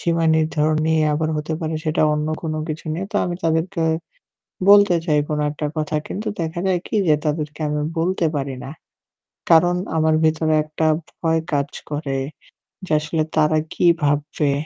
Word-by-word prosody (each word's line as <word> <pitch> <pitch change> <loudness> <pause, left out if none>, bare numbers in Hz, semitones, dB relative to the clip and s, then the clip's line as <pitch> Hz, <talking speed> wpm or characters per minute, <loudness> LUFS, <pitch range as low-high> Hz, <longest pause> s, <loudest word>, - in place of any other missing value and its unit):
সীমা 165 -1 +1
নির্ধারণ 155 -1 +1
নিয়ে 160 -1 +3
আবার 155 +1 0
হতে 150 +1 -3
পারে 160 -1 -2
সেটা 155 0 +1
অন্য 150 0 -1 0.2
কোন 160 -2 -2 0.2
কিছু 155 0 -5
নিয়ে। 175 +5 -3
তো - - 0
আমি 175 - -2
তাদেরকে 165 +2 0 0.9
বলতে 205 -3 +7
চাই 150 -3 +3
কোন 150 -1 -1
একটা 150 +1 -4
কথা 155 0 -1
কিন্তু 210 +3 -5
দেখা 165 +1 -2
যায় 185 -2 +2
কি - - -3
যে 155 - +5
তাদেরকে 150 0 -2
আমি 150 0 -1 0.2
বলতে 175 +1 +1
পারি 135 -2 -2
না। - - -7 0.8
কারণ 175 +2 +5 0.2
আমার 160 0 +3
ভেতরে 155 0 +2
একটা 155 +1 -1 0.3
ভয় 165 -1 +2
কাজ 140 -1 +1 0.2
করে 145 -2 -2 0.7
যে 160 - -3
আসলে 155 +1 -1
তারা 155 0 +3
কি - - +1 0.2
ভাববে? 145 0 +1
155 Hz, 170 wpm, -21 LUFS, 150-165 Hz, 0.9 s, বলতে